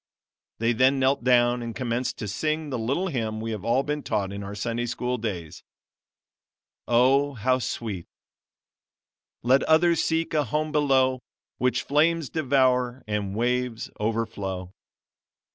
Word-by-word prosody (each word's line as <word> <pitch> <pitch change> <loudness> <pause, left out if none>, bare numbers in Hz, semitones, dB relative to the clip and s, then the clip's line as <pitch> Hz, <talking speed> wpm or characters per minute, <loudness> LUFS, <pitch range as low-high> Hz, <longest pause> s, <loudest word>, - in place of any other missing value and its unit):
They 115 +1 +1
then 130 +4 +4
knelt 135 0 +2
down 120 -1 +3
and 115 -1 -5
commenced 125 -1 -2
to 105 - -5
sing 155 +8 -2
the 125 - -2
little 140 +12 -1
hymn 110 -7 -2
we 115 +1 -4
have 105 -3 -5
all 120 +4 +2
been 150 +1 -2
taught 100 -6 -2
in 100 - -5
our 100 +1 -6
Sunday 120 +3 -2
School 125 +1 -2
days. 90 -8 -5 1.3
Oh! 135 +4 +3
how 130 +3 +1
sweet: 105 -7 -4 1.4
"Let 130 +3 +4
others 170 +1 +4
seek 165 0 0
a 150 -2 +2
home 155 +5 -1
below, 135 -3 +2 0.4
which 125 0 +1
flames 155 0 +2
devour 130 -4 +1
and 105 -2 -2
waves 125 0 -1
overflow." 105 -4 -3
125 Hz, 140 wpm, -25 LUFS, 110-140 Hz, 1.4 s, then